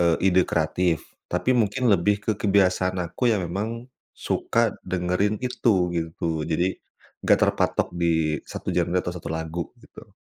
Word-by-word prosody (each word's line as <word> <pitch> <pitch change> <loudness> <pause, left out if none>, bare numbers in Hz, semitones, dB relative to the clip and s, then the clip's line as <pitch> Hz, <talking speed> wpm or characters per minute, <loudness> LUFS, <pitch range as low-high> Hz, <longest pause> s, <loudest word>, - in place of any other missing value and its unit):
eee, 85 -1 +4 0.2
ide 95 - +5
kreatif, 80 +1 0 0.2
tapi 130 - +1
mungkin 120 +1 +1
lebih 100 +2 +3
ke - - +1
kebiasaan 95 -2 +2
aku 120 +9 -1
yang 105 -5 +1
memang 110 +7 -4 0.3
suka - - 0 0.2
dengerin 90 +3 0
itu, 100 -8 +1
gitu. 80 -1 -2
Jadi 85 +3 0 0.4
nggak - - +4
terpatok - - 0
di 80 -3 +1
1 - - -4
genre 85 - +1
atau 90 -1 -1
1 90 - -7
lagu, 80 +1 -4 0.2
gitu. - - -15
90 Hz, 145 wpm, -24 LUFS, 85-100 Hz, 0.4 s, ide